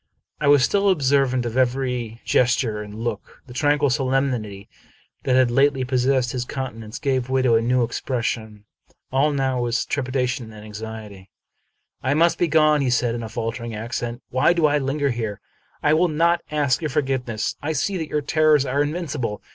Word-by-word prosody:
I 150 - 0
was 145 -2 +6
still 200 +5 +2
observant 135 -6 +2
of 115 0 -4
every 125 -3 -1
gesture 120 -3 +1
and 105 0 -9
look. 115 -2 -5
The 125 - -12
tranquil 145 0 +2
solemnity 130 -7 -1 0.6
that 130 - +2
had 130 -2 +4
lately 135 +1 +3
possessed 130 0 +1
his 125 -2 -2
countenance 115 -4 -6
gave 130 -3 -1
way 130 0 +1
to 125 -2 +3
a 115 - +4
new 125 +1 +2
expres 120 +1 -3
sion. 110 -3 -4 0.5
All 140 +3 +2
now 135 -3 0
was 120 -1 0
trepidation 125 -3 -2
and 105 0 -11
anxiety. 105 -2 -9 0.4
" - - -48 0.3
I 130 +3 +1
must 165 +2 +3
be 175 - +3
gone," 150 -3 +3
said 125 -1 +1
he, - - -3
in - - -5
a 110 - -6
faltering 115 0 -4
accent. 120 +2 -4
" - - -59
Why 130 +7 +3
do 170 -2 +2
I 150 0 +3
linger 140 +1 0
here? 110 -4 -4 0.4
I 150 - +4
will 170 +3 +4
not 170 +2 +2
ask 145 -2 +1
your 155 - -2
forgiveness. 130 -6 -1
I 155 +2 -2
see 195 +5 -1
that 160 -3 -4
your 150 - 0
terrors 150 -1 +3
are 140 +2 0
invincible. 145 - -3
130 Hz, 185 wpm, -22 LUFS, 115-145 Hz, 0.6 s, was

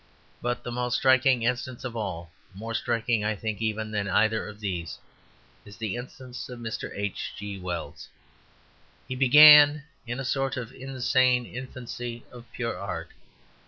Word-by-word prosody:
But 120 0 -2
the 120 - -5
most 125 0 -1
striking 130 -2 +4
instance 125 +1 -2
of 125 -2 -5
all, 90 -7 -4 0.2
more 115 +3 -6
striking, 115 -1 0
I 105 +1 0
think, 110 +1 -4
even 110 -1 -2
than 105 -2 -1
either 110 +3 +2
of 105 0 -10
these, 90 -7 -4 0.7
is 100 -1 -13
the 110 -2 -3
instance 125 +1 -8
of 125 - -7
Mr. 115 -1 -5
H. 100 -1 -4
G. 100 -1 -6
Wells. 90 -2 -6 1.0
He - - -4
began 145 +2 +8 0.2
in 120 +2 -4
a 135 - -4
sort 135 +1 -1
of 125 -2 -5
insane 130 -1 +1
infancy 120 -1 -7
of 120 -1 -13
pure 115 -1 -3
art. 90 -3 -5
120 Hz, 155 wpm, -27 LUFS, 105-130 Hz, 1.0 s, began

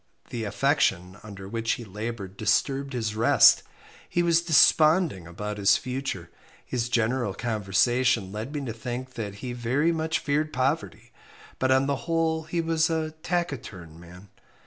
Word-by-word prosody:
The 115 -2 -3
affection 100 - 0
under 100 -2 -10
which 115 +2 -1
he 120 - -6
laboured 105 -1 -6
disturbed 135 +6 0
his 110 -4 -2
rest. 110 - +6 0.5
He 175 - +1
was 170 -1 +3
desponding 155 - +4
about 105 +4 -6
his 100 0 +5
future 125 -10 -5 0.3
his 120 -2 -2
general 115 -3 0
conversation 110 0 +1
led 110 +6 -5
me 145 -2 -4
to 115 - -4
think 125 +2 -6
that 105 -4 -5
he 125 - -4
very 130 +7 +1
much 160 -1 -1
feared 150 +1 -1
poverty, 135 +5 -2 0.5
but 130 - +1
on 130 +1 +4
the 140 0 0
whole 160 -1 0
he 170 +1 -1
was 165 0 +1
a 160 -1 -1
taciturn 115 - -4
man. 90 +3 -14
125 Hz, 150 wpm, -26 LUFS, 105-150 Hz, 0.5 s, rest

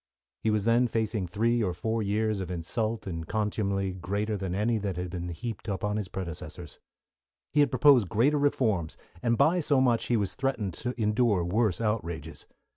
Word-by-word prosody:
He 110 - +1
was 105 -1 +1
then 120 +2 +4
facing 110 -4 -1
three 115 +6 +1
or 90 -5 -1
four 110 +5 -1
years 105 0 0
of 95 -2 -4
insult 110 +6 -2
and 85 -4 -5
contumely 100 -2 -1
greater 100 +4 -2
than 95 -2 -3
any 110 +3 +1
that 100 -3 -3
had 90 -1 -4
been 90 -1 -4
heaped 110 +7 -6
upon 105 +1 -1
his 105 -3 -3
predecessors. 90 -3 -7 0.7
He 150 - +3
had 145 - +5
proposed 130 - +5
greater 140 +7 +3
reforms, 110 - +1 0.2
and 115 -1 +1
by 175 +8 +4
so 145 -4 +2
much 120 -3 +2
he 120 - +2
was 100 -3 -1
threatened 130 -8 -2
to 125 +5 -5
endure 105 -3 +2
worse 105 +1 +1
outrages. 105 -7 -3
105 Hz, 180 wpm, -28 LUFS, 95-115 Hz, 0.7 s, had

